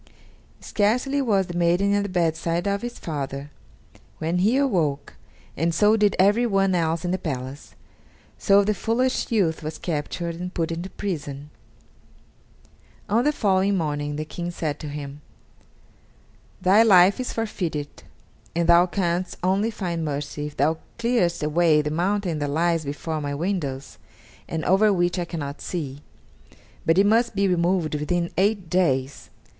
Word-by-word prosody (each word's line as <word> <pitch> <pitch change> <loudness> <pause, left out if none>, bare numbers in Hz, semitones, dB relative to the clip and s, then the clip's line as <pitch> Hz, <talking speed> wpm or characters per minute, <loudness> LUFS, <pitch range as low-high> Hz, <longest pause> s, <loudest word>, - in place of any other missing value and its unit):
Scarcely 250 +7 +1
was 205 -7 +2
the 175 - -7
maiden 175 +4 +2
at 205 - +2
the 200 - -3
bedside 170 0 0
of 200 0 0
her 240 - -3
father, 145 - -5 0.7
when 165 +3 -1
he 215 +8 +3
awoke, 170 - 0 0.4
and 165 +2 0
so 210 +5 +4
did 210 -2 +2
everyone 195 -1 +3
else 165 -1 0
in 175 - -1
the 185 - -1
palace; 135 -4 -6 0.6
so 200 +1 +4
the 210 +1 +1
foolish 240 +7 0
youth 185 -8 +1
was 155 0 -5
captured 170 +1 -3
and 180 +1 -6
put 165 -2 -1
into 170 +3 -4
prison. 145 -7 -5 1.6
On 225 +4 +3
the 295 - +3
following 195 -6 +1
morning 145 -3 -2
the 155 +1 -4
King 175 +2 -5
said 160 -4 -3
to 150 - -6
him: 145 0 -7 1.4
"Thy 195 +4 +5
life 195 -2 +6
is 255 - -3
forfeited, 175 -10 -4 0.5
and 170 0 +1
thou 175 +1 +6
canst 180 -1 -2
only 195 +4 +2
find 175 -6 -3
mercy 145 0 -3
if 150 - -11
thou 160 +3 +1 0.2
clearest 230 -9 +1
away 155 0 +3
the 150 - -2
mountain 180 0 0
that 145 -1 -2
lies 165 +2 +1
before 150 +2 -4
my 145 -1 -3
windows, 145 -6 -3 0.5
and 160 -1 -3
over 205 +3 +4
which 175 -1 +1
I 175 - -1
cannot 145 -4 -6
see, 145 -5 -5 0.9
but 165 +2 +4
it 195 - +5
must 230 +2 +2
be 200 0 +2
removed 175 -2 +1
within 170 +3 -1
eight 200 -1 +1
days. 140 -7 0
175 Hz, 150 wpm, -24 LUFS, 155-200 Hz, 1.6 s, life